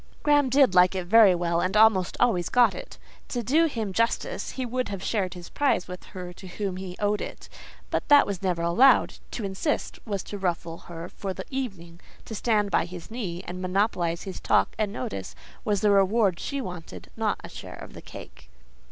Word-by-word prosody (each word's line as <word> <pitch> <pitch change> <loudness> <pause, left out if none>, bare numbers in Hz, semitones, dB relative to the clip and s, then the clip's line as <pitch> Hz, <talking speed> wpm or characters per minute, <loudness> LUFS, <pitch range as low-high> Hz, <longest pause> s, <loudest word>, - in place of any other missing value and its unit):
Graham 290 -2 +4
did 265 -5 +4
like 180 +1 +5
it 185 -2 -2
very 205 -1 +7
well, 170 -1 0
and 190 +3 0
almost 210 -5 +4
always 200 -8 +2
got 240 -5 +4
it. 180 - -9 0.3
To 240 -2 -3
do 305 +9 +3
him 220 -9 -3
justice, 230 - -1
he 260 - -3
would 250 +1 -2
have 195 -2 -5
shared 195 -4 -1
his 175 -1 -9
prize 285 -10 +1
with 180 0 -8
her 180 -2 -8
to 190 +1 -12
whom 190 0 -4
he 185 -1 -6
owed 205 0 +1
it; - - -7 0.4
but - - -1
that 290 0 +7
was 200 -3 -4
never 180 -3 -1
allowed: 230 +11 +4
to 225 - -4
insist, 195 +10 -2
was 200 -4 -3
to 205 - -7
ruffle 170 -3 -2
her 170 0 -7
for 190 0 -6
the - - -6
evening. 190 -11 -5 0.3
To - - -8
stand 210 -2 +1
by - - +2
his 175 +1 -10
knee, 190 -7 -4
and 180 +1 -6
monopolize 180 -3 0
his 190 -2 -7
talk - - +2
and 210 -2 0
notice, 100 - -5 0.3
was 205 -3 0
the 210 - +4
reward 195 -2 +3
she 280 -1 -3
wanted—not 170 - -4
a - - -8
share - - -9
of - - -11
the - - -10
cake. 60 +2 -12
195 Hz, 200 wpm, -26 LUFS, 180-225 Hz, 0.4 s, very